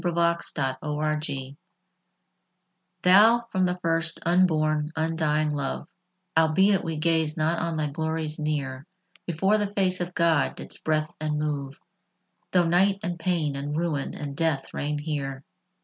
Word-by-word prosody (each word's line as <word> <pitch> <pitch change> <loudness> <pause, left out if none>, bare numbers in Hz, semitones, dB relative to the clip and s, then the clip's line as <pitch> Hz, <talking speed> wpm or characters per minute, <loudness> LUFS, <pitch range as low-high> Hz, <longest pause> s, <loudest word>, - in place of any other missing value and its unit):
XIX 170 -1 +1 0.3
=Love= 155 0 -1
I 135 -1 -5 1.5
Thou, 220 +6 +6
from 185 -1 +2
the 180 0 -1
first, 165 -1 +1
unborn, 155 -4 +2
undying 155 -1 +1
love, 140 -2 -3 0.5
Albeit 180 +5 +4
we 165 -1 -3
gaze 160 -1 +1
not 160 +2 +1
on 170 -1 -2
thy 155 - 0
glories 160 +1 -3
near, 145 -2 -3 0.4
Before 190 +6 +2
the 205 -1 -1
face 185 -2 +1
of 175 0 -4
God 165 -4 +2
didst - - -8
breath 155 +1 0
and 155 -1 -1
move, 145 -2 -3 0.7
Though 180 -2 +3
night 190 +4 +3
and 175 0 -3
pain 165 -5 0
and 145 +2 -3
ruin 160 -4 -2
and 145 -2 -5
death 150 -4 -1
reign 150 +1 -2
here. 140 -3 -4
160 Hz, 140 wpm, -26 LUFS, 150-175 Hz, 1.5 s, Thou